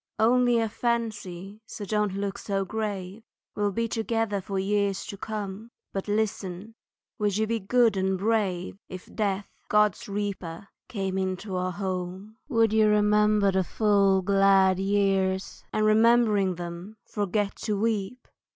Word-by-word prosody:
Only 245 +2 +4
a 225 -1 +1
fancy, 210 -4 -3
so 205 - -7
don't 210 -1 0
look 200 0 -3 0.3
grave, 205 -1 -4 0.3
We'll 205 -1 0
be 230 +4 -1
together 225 -2 -1
for 195 +1 -4
years 200 0 0
to 210 - -6
come, 210 +1 -6 0.2
But, 195 +1 -3
listen, 205 -1 -2 0.5
would 205 -2 +1
you 220 - +2
be 230 +1 -1
good 230 +2 +3
and 190 0 0
brave 195 -3 -1
If 185 0 -10
Death, 205 -2 -1 0.2
God's 210 -2 +2
reaper, 200 -3 -4 0.2
came 195 -3 -2
into 190 +1 -3
our 185 0 -1
home? 190 +2 -5
Would 225 -4 +3
you 220 -1 +5
remember 210 -1 +3
the 190 0 +1
full 200 -1 +2
glad 195 -1 +4
years, 195 -1 0
And 215 - +1
remembering 215 -3 +4
them 175 +5 -7
forget 205 0 -1
to 210 -3 -2
weep? 225 +2 -2
205 Hz, 140 wpm, -27 LUFS, 190-215 Hz, 0.5 s, you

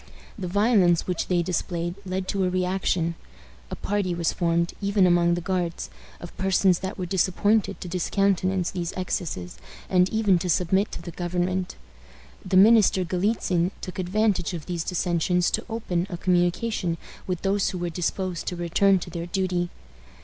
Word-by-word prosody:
The 190 -3 -5
violence 195 -3 +3
which 180 -2 -2
they 175 -2 +1
displayed 175 -1 -2
led 185 0 -3
to 195 -1 0
a 185 - +2
reaction. 180 -2 0 0.6
A - - -4
party 195 -3 -1
was 170 -1 0
formed, 170 -1 0
even 200 -1 +3
among 175 -1 +4
the 175 - -3
Guards, 175 -2 -2 0.3
of 175 - -10
persons 190 -1 +3
that 190 +1 -5
were 185 - -3
disposed 195 +4 +2
to - - -7
discountenance 185 0 0
these 175 -2 -3
excesses, 165 - -4 0.3
and 180 0 +4
even 210 -5 +2
to 180 +1 -3
submit 190 +4 +2
to - - -7
the 175 - -7
government. 180 +2 -2 0.7
The 185 0 +1
minister 205 -2 +6
Galitzin 180 -1 0
took 185 - -7
advantage 190 -1 0
of 160 - -7
these 175 -3 -3
dissensions 180 0 +1
to - - -1
open 190 -6 -2
a 175 - -4
communication 175 +1 0 0.3
with 180 -2 -3
those 195 0 +1
who 185 - -4
were 175 -1 -3
disposed 180 +1 -3
to 180 - -2
return 175 +3 +3
to 175 -1 -7
their 170 0 -5
duty. 180 -2 -1
180 Hz, 165 wpm, -25 LUFS, 175-190 Hz, 0.7 s, minister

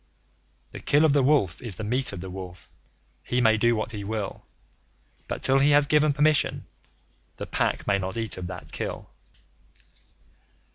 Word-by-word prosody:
The - - -8
Kill 150 +2 +3
of 150 - +3
the 145 - +4
Wolf 130 - +2
is 115 -7 -5
the 110 - -6
meat 125 +5 0
of 95 -3 -7
the 95 - -7
Wolf. 90 -1 -9 0.5
He 125 - -2
may 110 -3 +4
do 120 +2 +2
what 110 +1 -3
he 105 -2 -6
will, 105 -1 -4 0.9
But, - - -5
till 135 +1 +4
he 140 +2 +4
has 145 - +3
given 150 +1 +3
permission, 150 +1 +1 0.7
the - - -5
Pack - - -1
may 100 -1 +1
not 95 +2 -4
eat 115 -2 +1
of 90 -1 -6
that 90 - -9
Kill. - - -5
115 Hz, 175 wpm, -25 LUFS, 100-140 Hz, 0.9 s, the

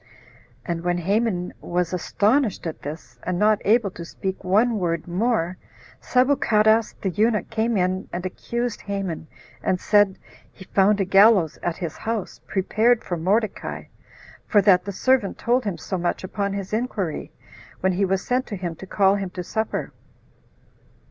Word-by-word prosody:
And 170 -2 -2
when 175 0 +1
Haman 190 0 0
was 175 0 -1
astonished 210 - +1
at 165 - -5
this, 150 +3 -8
and 180 -1 -2
not 210 +2 +3
able 215 -1 +3
to 170 - -8
speak 190 +3 -5
one 215 +4 +2
word 170 -2 -1
more, 185 -1 0 0.4
Sabuchadas 230 -4 +3
the 190 - 0
eunuch 215 +5 +1
came 225 0 0
in 185 +1 -1
and 175 +1 -4
accused 235 +5 -3
Haman, 195 -6 -4 0.3
and 185 - 0
said, 205 -2 +3 0.3
He 190 - -13
found 200 +2 +3
a - - +1
gallows 195 -4 +5
at 175 -1 -2
his 170 -4 -5
house, 225 -3 -4
prepared 220 +5 +2
for 175 - -3
Mordecai; 200 +6 -1 0.6
for 210 - +4
that 185 -2 +5
the 200 - -3
servant 250 +1 +1
told 245 +1 +1
him 195 -5 -2
so 175 +3 -4
much 175 +2 -1
upon 200 +1 -2
his 200 0 -5
inquiry, 215 - -2 0.5
when 190 - +2
he 185 +2 0
was 190 0 -1
sent 255 +1 0
to 210 - -4
him 175 -3 -4
to 190 - -10
call 195 0 +3
him 195 -2 -3
to 180 0 -6
supper. 220 +5 -3
195 Hz, 160 wpm, -23 LUFS, 180-220 Hz, 0.6 s, gallows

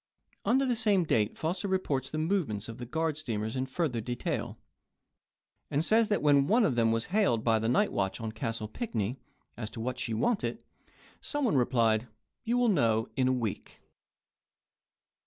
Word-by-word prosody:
Under 265 +3 +3
the 250 -2 +1
same 210 -5 +3
date 110 -9 +1
Foster 175 +5 -2
reports 145 -9 -1
the 155 - -4
move 170 +1 +1
ments 105 -1 -5
of 115 +1 -8
the 120 - -6
guard 160 +3 -1
steamers 110 -6 -3
in 130 0 -1
further 130 -4 -1
detail, 120 +2 -3 1.1
and 150 +4 0
says 225 +2 +4
that 205 - 0
when 140 -2 +4
one 225 +4 +4
of 145 - +2
them 115 -1 +2
was 115 0 0
hailed 190 - +2
by 110 -2 +3
the 110 +1 0
night 200 +12 +2
watch 95 +2 -1
on 110 -1 -4
Castle 115 -1 -3
Pinckney 115 - -3 0.4
as 110 -2 -5
to 115 - -9
what 125 +2 -3
she 115 -3 -2
wanted, 205 - -1 0.6
some 290 -2 -2
one 220 - +2
replied, 120 -3 +2 0.4
"You 240 +1 0
will 245 -1 +3
know 115 - +2
in 130 -1 +2
a - - +3
week." 120 -5 -4
130 Hz, 180 wpm, -30 LUFS, 115-185 Hz, 1.1 s, says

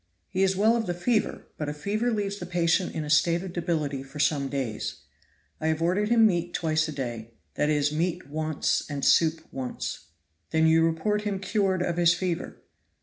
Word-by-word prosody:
"He 185 - -1
is 190 0 +3
well 215 +4 +4
of 230 -2 -1
the 175 - -1
fever, 215 +4 0
but 150 -1 -3
a 150 - -4
fever 215 +10 -1
leaves 205 -2 -2
the 175 - -6
patient 175 +1 +1
in 160 - -2
a 150 - -6
state 170 +3 +3
of 185 -2 -7
debility 155 -6 -1
for 135 +2 -11
some 145 -1 +1
days. 130 -7 -3 0.6
I 160 - -1
have 160 0 +1
ordered 185 +5 +1
him 230 -1 +6
meat 175 -4 +1
twice 155 -1 +1
a - - -4
day 120 -5 -5 0.2
that 150 - 0
is, 145 -1 +2
meat 170 +2 -1
once 155 +1 0
and 140 -2 -3
soup 160 -1 +4
once." 130 - -5 0.4
"Then 160 0 +2
you 160 0 +5
report 165 +6 +1
him 205 -2 -2
cured 195 -2 0
of 175 -1 -2
his 175 0 +5
fever?" 175 -1 -4
165 Hz, 200 wpm, -27 LUFS, 150-190 Hz, 0.6 s, him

